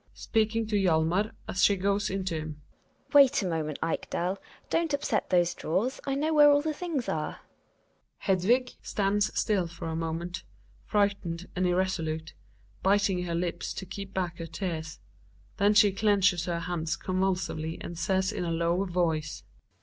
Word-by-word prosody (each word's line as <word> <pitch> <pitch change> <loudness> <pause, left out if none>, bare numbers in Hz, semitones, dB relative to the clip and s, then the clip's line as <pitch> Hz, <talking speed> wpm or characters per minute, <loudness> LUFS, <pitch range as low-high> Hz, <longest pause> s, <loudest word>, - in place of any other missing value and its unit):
(Speaking 225 0 0
to 215 0 -2
Hjalmar 180 +2 +2 0.2
as 185 - 0
she 200 - +6
goes 200 +2 0
in 190 0 -2
to 185 - -1
him.) 155 -1 -7 0.5
Wait 275 -6 +6
a - - -1
moment, 155 -3 -2
Ekdal, 180 +3 -2 0.3
don't 330 -3 +2
upset 265 -6 -1
those 175 -1 +3
drawers, 215 - -1
I 275 - 0
know 310 +3 0
where 295 -1 +8
all 290 0 +4
the 310 0 -1
things 300 -6 -3
are. 155 -1 -3 0.8
Hedvig 230 +7 +2
(stands 205 +1 +1
stUl 190 -6 +1
for 165 0 -7
a 160 - -3
moment, 165 +2 -3 0.5
frightened 195 -4 0
and 185 0 +1
irresolute, 165 -3 -1 0.5
biting 195 -2 +2
her 170 -1 -2
lips 170 0 -2
to 190 - -5
keep 195 0 -7
back 180 -3 -3
her 165 - -5
tears, 160 -4 -4 0.6
then 205 +1 +3
she 205 -1 +6
clenches 195 -3 +2
her 170 -1 -2
hands 165 -2 -2
convulsively 185 -4 -1
and 170 - -7
says 190 +2 0
in - - -3
a 170 - -2
low 170 +3 +1
voice). 165 -4 -1
185 Hz, 160 wpm, -28 LUFS, 170-205 Hz, 0.8 s, where